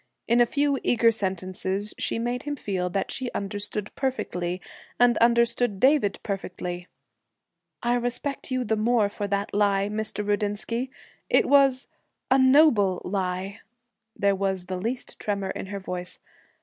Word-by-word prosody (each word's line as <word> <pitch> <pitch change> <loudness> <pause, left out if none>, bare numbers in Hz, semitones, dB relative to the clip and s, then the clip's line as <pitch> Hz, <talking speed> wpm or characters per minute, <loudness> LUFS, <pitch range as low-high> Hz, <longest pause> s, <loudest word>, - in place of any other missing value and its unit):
In 235 +1 +4
a 240 - +5
few 280 +1 +1
eager 230 -1 +4
sentences 190 0 -3
she - - -1
made 240 +2 -2
him 290 0 -3
feel 190 -8 -2
that 195 +2 -2
she 255 -2 -3
understood 205 +1 -3
perfectly, 180 -9 -2 0.4
and 245 0 +5
understood 235 -2 +3
David 260 -6 +3
perfectly. 180 -3 -4 1.0
'I 240 - +2
respect 245 +4 -2
you 255 -1 0
the 220 -1 0
more 215 -1 +2
for 205 0 -4
that 200 0 -2
lie, 200 -1 +2
Mr. 210 -1 -3
Rudinsky. 210 +4 -1 0.4
It - - +4
was 275 -2 +4 0.4
a 265 - +6
noble 260 - +5
lie!' 190 +1 -2 0.6
There 200 -1 +2
was 190 -2 -1
the 185 0 -4
least 240 +4 -4
tremor 200 -2 -2
in - - -6
her 200 0 -5
voice. 180 -1 -6
210 Hz, 145 wpm, -26 LUFS, 195-245 Hz, 1.0 s, a